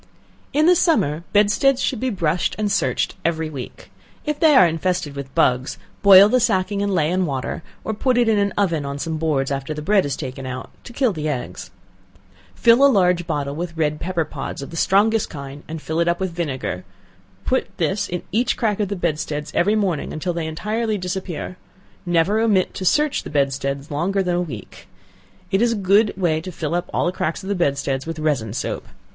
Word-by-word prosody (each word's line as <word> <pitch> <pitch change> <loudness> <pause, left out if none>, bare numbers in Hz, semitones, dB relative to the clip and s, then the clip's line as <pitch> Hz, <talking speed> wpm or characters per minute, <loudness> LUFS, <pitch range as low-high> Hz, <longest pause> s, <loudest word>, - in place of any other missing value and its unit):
In 300 +2 +3
the 360 +1 +6
summer, 170 - +2
bedsteads 210 +6 +3
should 255 - -1
be 260 - 0
brushed 175 -5 0
and 210 -1 -1
searched - - 0
every 160 -1 -1
week; 130 -4 -9 0.3
if 300 -1 -2
they 315 -3 +5
are 185 - +8
infested 165 -2 -2
with 140 -1 -7
bugs, 125 +1 +2 0.2
boil 200 0 +9
the 255 +4 +3
sacking 200 -3 +1
in 205 - 0
ley 170 -5 +1
and 185 -1 +1
water, 135 +1 -3 0.2
or 220 - -2
put 250 +3 +1
it 240 -1 +3
in 215 -2 +3
an 200 0 +1
oven, 170 -7 +1
on 140 0 -4
some 160 +2 -3
boards, 145 -4 0
after 140 +2 -3
the 150 - -5
bread 200 +3 +3
is 140 -2 -2
taken 130 -2 -6
out, 130 0 -6
to - - -9
kill 245 -3 +1
the 155 -2 -3
eggs; 120 -10 -5 0.9
fill 235 +3 +5
a 280 - +8
large 180 -5 +2
bottle 145 -3 -2
with 170 0 -5
red 150 -1 0
pepper 170 -2 -1
pods 140 -2 -6
of - - -9
the - - -8
strongest 210 +5 +2
kind, 140 -1 -8
and 160 0 -7
fill 160 +1 -2
it 170 - +2
up 170 0 +1
with 190 -2 -2
vinegar; 140 - -3 0.6
put 260 - +1
this 195 +2 -1
in 175 0 -4
each 230 +6 +1
crack 215 -3 0
of 205 - +1
the 200 - -3
bedsteads 155 -3 -2
every 205 +5 +2
morning, 190 -8 -1
until 175 +3 -3
they 165 -2 -3
entirely 215 +7 -2
disappear; 180 -1 -5 0.5
never 175 +5 +2
omit 210 -5 +2
to - - -5
search 300 - +2
the - - -8
bedsteads 140 0 -1
longer 190 +7 0
than 180 -1 0
a 175 - +1
week. 125 - -8 0.6
It 195 +1 +2
is 235 -1 +3
a - - -2
good 205 +2 +3
way 165 -4 +1
to 185 - -7
fill 160 -1 -4
up 175 0 -2
all - - 0
the 175 - +1
cracks 175 0 -3
of 190 - -6
the - - +2
bedsteads 140 -5 -1
with 165 -1 -4
resin 140 -9 -1
soap. - - -4
175 Hz, 210 wpm, -21 LUFS, 150-205 Hz, 0.9 s, boil